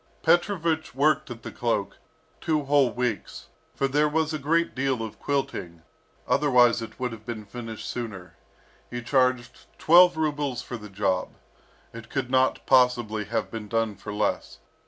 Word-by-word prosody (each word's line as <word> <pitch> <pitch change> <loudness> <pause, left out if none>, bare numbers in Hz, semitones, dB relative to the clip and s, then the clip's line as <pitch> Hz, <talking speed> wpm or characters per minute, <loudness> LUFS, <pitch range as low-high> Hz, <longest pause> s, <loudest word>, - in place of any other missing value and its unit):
Petrovich 170 -3 +1
worked 155 +2 +2
at 115 -2 -9
the - - -6
cloak 115 -4 -2 0.4
two 155 -2 0
whole 140 -2 +3
weeks, 120 -4 -4 0.3
for 135 - +1
there 150 +2 +2
was 160 +1 0
a 155 - -2
great 165 +4 +1
deal 130 -3 -1
of 110 - -8
quilting; 90 -12 -3 0.4
otherwise 125 -5 +4
it 115 - -9
would 125 -1 -2
have 110 -2 -10
been 110 -2 -6
finished 115 0 -7
sooner. 100 -8 -6 0.5
He 120 -1 -5
charged 125 -1 0
twelve 175 +1 +6
rubles 145 -5 -1
for 120 - -6
the 105 -1 -11
job, 100 -2 -1 0.6
it 115 0 -10
could 130 -2 -3
not 130 0 +2
possibly 120 -5 +3
have 115 +4 -2
been 110 -2 -6
done 115 0 0
for 100 +1 -8
less. 105 0 -2
125 Hz, 155 wpm, -26 LUFS, 110-145 Hz, 0.6 s, twelve